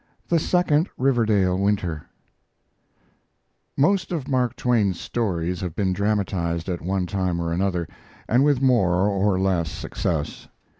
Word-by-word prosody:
THE 170 Hz, -, +3 dB
SECOND 165 Hz, -1 st, +2 dB
RIVERDALE 110 Hz, -8 st, +2 dB
WINTER 95 Hz, -6 st, -1 dB, 1.7 s
Most 185 Hz, +7 st, +2 dB
of 155 Hz, -7 st, -3 dB
Mark 125 Hz, -3 st, 0 dB
Twain's 105 Hz, -7 st, +1 dB
stories 90 Hz, -6 st, -2 dB
have 90 Hz, -4 st, -4 dB
been 95 Hz, -3 st, 0 dB
dramatized 95 Hz, -4 st, -1 dB
at 90 Hz, -2 st, -3 dB
one 95 Hz, +1 st, -1 dB
time 90 Hz, -1 st, -1 dB
or 85 Hz, -1 st, -2 dB
another, 90 Hz, -2 st, -1 dB, 0.4 s
and 125 Hz, +4 st, +3 dB
with 140 Hz, -2 st, +2 dB
more 95 Hz, -7 st, +3 dB
or 100 Hz, -1 st, +1 dB
less 90 Hz, -4 st, +1 dB
success. 75 Hz, -4 st, -4 dB
100 Hz, 130 wpm, -23 LUFS, 90-125 Hz, 1.7 s, THE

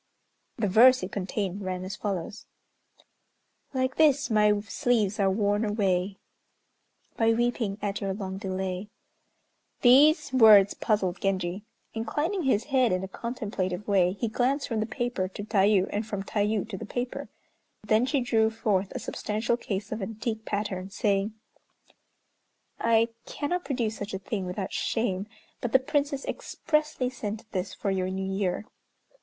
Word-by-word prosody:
The 220 Hz, -4 st, 0 dB
verse 240 Hz, +4 st, +6 dB
it 185 Hz, -, -4 dB
contained 195 Hz, 0 st, -3 dB
ran 185 Hz, -1 st, -3 dB
as 190 Hz, +1 st, -5 dB
follows: 200 Hz, 0 st, -4 dB, 1.2 s
"Like 260 Hz, -1 st, -1 dB
this, 290 Hz, -4 st, +4 dB
my 210 Hz, -1 st, +4 dB
sleeves 215 Hz, 0 st, 0 dB
are 195 Hz, -1 st, +3 dB
worn 205 Hz, +2 st, +1 dB
away, 195 Hz, -3 st, 0 dB, 1.0 s
By 225 Hz, 0 st, +4 dB
weeping 230 Hz, -3 st, 0 dB
at 200 Hz, -1 st, -2 dB
your 195 Hz, -1 st, -1 dB
long 190 Hz, -2 st, -5 dB
delay." 190 Hz, 0 st, -3 dB, 0.9 s
These 285 Hz, +3 st, +6 dB
words 215 Hz, -5 st, +7 dB
puzzled 195 Hz, -5 st, 0 dB
Genji. 190 Hz, 0 st, -1 dB, 0.3 s
Inclining 295 Hz, -, -1 dB
his 225 Hz, -5 st, +2 dB
head 260 Hz, -4 st, +2 dB
in 185 Hz, +1 st, 0 dB
a -, -, -3 dB
contemplative 205 Hz, -4 st, -4 dB
way, 185 Hz, -3 st, +3 dB
he 230 Hz, +4 st, -2 dB
glanced 260 Hz, +6 st, 0 dB
from 225 Hz, -2 st, -1 dB
the 215 Hz, -, -1 dB
paper 240 Hz, -6 st, -2 dB
to 195 Hz, +2 st, -7 dB
Tayû, 200 Hz, -2 st, +3 dB
and 210 Hz, -, -1 dB
from 205 Hz, -3 st, -4 dB
Tayû 210 Hz, +1 st, 0 dB
to 195 Hz, -, -5 dB
the -, -, -6 dB
paper. 255 Hz, +3 st, -4 dB, 0.5 s
Then 215 Hz, +4 st, +3 dB
she 280 Hz, -1 st, +1 dB
drew 225 Hz, -2 st, +2 dB
forth 205 Hz, -4 st, 0 dB
a -, -, -3 dB
substantial 215 Hz, +3 st, -1 dB
case 200 Hz, -4 st, -4 dB
of 220 Hz, 0 st, -3 dB
antique 220 Hz, +2 st, -4 dB
pattern, 195 Hz, -2 st, -3 dB
saying, 200 Hz, 0 st, 0 dB, 1.4 s
"I 230 Hz, 0 st, +3 dB, 0.2 s
cannot 355 Hz, +5 st, -2 dB
produce 235 Hz, -6 st, -1 dB
such 205 Hz, -1 st, -5 dB
a -, -, -1 dB
thing 195 Hz, -1 st, -4 dB
without 185 Hz, +1 st, -4 dB
shame, 205 Hz, -4 st, -1 dB, 0.3 s
but 240 Hz, -, -3 dB
the -, -, +9 dB
Princess 280 Hz, +1 st, -1 dB
expressly 305 Hz, -, -1 dB
sent 220 Hz, -4 st, -5 dB
this 185 Hz, -2 st, -3 dB
for 200 Hz, -, -2 dB
your 185 Hz, -1 st, -1 dB
New 190 Hz, 0 st, -3 dB
Year. 190 Hz, +1 st, -1 dB
210 Hz, 150 wpm, -27 LUFS, 195-240 Hz, 1.4 s, the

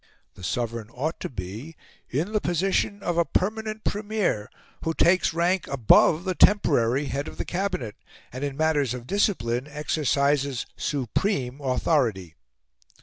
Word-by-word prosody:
The 95 Hz, -, -14 dB
Sovereign 115 Hz, +2 st, -3 dB
ought 155 Hz, +6 st, -3 dB
to -, -, -4 dB
be 110 Hz, -, -7 dB, 0.3 s
"in 160 Hz, +10 st, -1 dB
the 215 Hz, -, +1 dB
position 195 Hz, +3 st, 0 dB
of 170 Hz, -1 st, 0 dB
a -, -, +5 dB
permanent 215 Hz, +5 st, -2 dB
Premier, 205 Hz, -, -1 dB, 0.3 s
who 165 Hz, 0 st, -1 dB
takes 180 Hz, +1 st, +3 dB
rank 175 Hz, +2 st, +1 dB
above 140 Hz, +5 st, +4 dB
the 190 Hz, -1 st, -1 dB
temporary 140 Hz, -, +4 dB
head 140 Hz, +1 st, -3 dB
of -, -, -9 dB
the -, -, -3 dB
Cabinet, 180 Hz, -, -2 dB, 0.4 s
and 130 Hz, +2 st, -5 dB
in 140 Hz, -1 st, -3 dB
matters 145 Hz, -6 st, +1 dB
of 120 Hz, -1 st, -8 dB
discipline 130 Hz, -, 0 dB
exercises 140 Hz, -3 st, 0 dB
supreme 140 Hz, -, -1 dB
authority." 125 Hz, -, 0 dB
145 Hz, 140 wpm, -25 LUFS, 125-180 Hz, 0.4 s, a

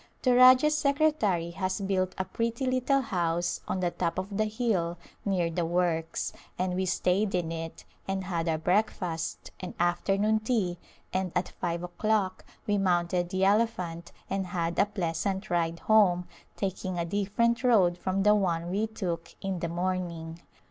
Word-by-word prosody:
The 255 Hz, -, +4 dB
Rajah's 255 Hz, +4 st, +7 dB
secretary 280 Hz, -, +1 dB
has 185 Hz, +3 st, -2 dB
built 190 Hz, -2 st, 0 dB
a 190 Hz, -, -1 dB
pretty 230 Hz, +5 st, -2 dB
little 255 Hz, +2 st, +2 dB
house 175 Hz, -6 st, -1 dB
on 185 Hz, -, -1 dB
the 175 Hz, -1 st, +1 dB
top 170 Hz, -1 st, -2 dB
of 190 Hz, +2 st, -3 dB
the 215 Hz, +2 st, +2 dB
hill 210 Hz, -7 st, -1 dB, 0.3 s
near 180 Hz, -4 st, +1 dB
the 170 Hz, +1 st, -1 dB
works, 165 Hz, -1 st, 0 dB, 0.2 s
and 185 Hz, 0 st, 0 dB
we 185 Hz, +1 st, -1 dB
stayed 185 Hz, +3 st, +1 dB
in 170 Hz, -2 st, -1 dB
it, 165 Hz, 0 st, -6 dB, 0.2 s
and 195 Hz, 0 st, -1 dB
had 170 Hz, -2 st, -2 dB
our 160 Hz, -, +1 dB
breakfast 180 Hz, -2 st, -1 dB
and 185 Hz, -, -7 dB
afternoon 195 Hz, +5 st, +2 dB
tea, 215 Hz, -6 st, -1 dB, 0.3 s
and 185 Hz, -1 st, 0 dB
at -, -, 0 dB
five 170 Hz, -1 st, -3 dB
o'clock 190 Hz, +1 st, 0 dB, 0.2 s
we 205 Hz, -1 st, +1 dB
mounted 175 Hz, -1 st, +1 dB
the 190 Hz, +1 st, +1 dB
elephant 185 Hz, -6 st, 0 dB, 0.2 s
and 195 Hz, -1 st, -2 dB
had 170 Hz, -1 st, -2 dB
a 200 Hz, -, +4 dB
pleasant 190 Hz, +1 st, -2 dB
ride 170 Hz, -1 st, +1 dB
home, 185 Hz, -5 st, +4 dB, 0.3 s
taking 185 Hz, -2 st, -3 dB
a 170 Hz, -, 0 dB
different 205 Hz, +6 st, 0 dB
road 200 Hz, -8 st, +4 dB
from 190 Hz, +2 st, -1 dB
the 210 Hz, +1 st, +6 dB
one 175 Hz, -4 st, 0 dB
we 210 Hz, +4 st, 0 dB
took 175 Hz, -6 st, -4 dB
in 190 Hz, -2 st, -3 dB
the 170 Hz, -, -2 dB
morning. 170 Hz, -2 st, -3 dB
185 Hz, 160 wpm, -28 LUFS, 175-210 Hz, 0.3 s, Rajah's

